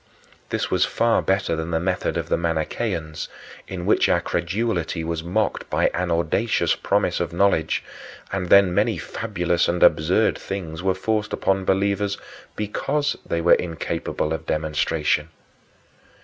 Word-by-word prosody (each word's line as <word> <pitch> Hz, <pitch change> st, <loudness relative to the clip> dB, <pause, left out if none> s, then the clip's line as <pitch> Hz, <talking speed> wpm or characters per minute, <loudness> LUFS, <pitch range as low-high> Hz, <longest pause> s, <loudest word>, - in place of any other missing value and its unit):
This -, -, -2 dB
was -, -, +3 dB
far 115 Hz, 0 st, +2 dB
better 95 Hz, -3 st, +1 dB
than 80 Hz, +1 st, -4 dB
the 80 Hz, -1 st, 0 dB
method 90 Hz, +1 st, -1 dB
of -, -, -3 dB
the -, -, +2 dB
Manicheans, 80 Hz, -1 st, -2 dB, 0.4 s
in 90 Hz, -2 st, -5 dB
which -, -, +3 dB
our -, -, +4 dB
credulity 85 Hz, -2 st, -1 dB
was 80 Hz, 0 st, -2 dB
mocked 100 Hz, +6 st, -1 dB
by -, -, +2 dB
an 90 Hz, 0 st, -1 dB
audacious 85 Hz, +7 st, +1 dB
promise -, -, 0 dB
of -, -, -2 dB
knowledge 85 Hz, -3 st, +1 dB, 0.5 s
and 90 Hz, -2 st, -2 dB
then 100 Hz, -2 st, +6 dB
many 105 Hz, +1 st, +2 dB
fabulous 85 Hz, +2 st, -1 dB
and 85 Hz, 0 st, +1 dB
absurd 90 Hz, +8 st, +4 dB
things 85 Hz, -5 st, -5 dB
were 95 Hz, 0 st, +1 dB
forced 105 Hz, +2 st, -1 dB
upon 95 Hz, 0 st, 0 dB
believers 100 Hz, +1 st, +1 dB, 0.4 s
because 140 Hz, +8 st, -1 dB
they 85 Hz, -, -2 dB
were 85 Hz, -, +6 dB
incapable 80 Hz, -2 st, -1 dB
of 80 Hz, 0 st, -5 dB
demonstration. 75 Hz, 0 st, 0 dB
90 Hz, 145 wpm, -23 LUFS, 80-100 Hz, 0.5 s, then